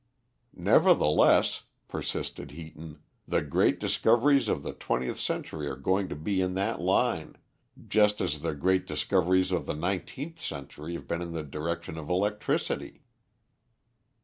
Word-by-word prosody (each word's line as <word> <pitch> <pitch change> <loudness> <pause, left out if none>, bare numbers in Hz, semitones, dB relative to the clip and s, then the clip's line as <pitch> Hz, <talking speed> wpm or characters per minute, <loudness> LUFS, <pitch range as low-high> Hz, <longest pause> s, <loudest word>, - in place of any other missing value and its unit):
"Nevertheless," 75 +1 +4 0.2
persisted - - -4
Heaton, 80 0 -10 0.3
"the - - +1
great - - +2
discoveries 120 +2 +3
of 70 - -1
the - - -5
twentieth 65 0 -2
century 75 -2 -3
are 70 - -3
going 95 +8 0
to - - -4
be 95 +6 -1
in 90 0 -1
that 100 +2 -1
line, 95 +2 +1 0.5
just 105 -1 +3
as 75 -5 -1
the 80 0 -2
great 95 +5 +1
discoveries 95 +1 +2
of 90 - -1
the - - -2
nineteenth 100 - -4
century 75 +3 -6
have - - -8
been 85 +1 -2
in 85 -1 -5
the 80 -2 -3
direction 80 +2 -4
of 75 - -8
electricity." 105 +3 -1
85 Hz, 140 wpm, -28 LUFS, 75-100 Hz, 0.5 s, Nevertheless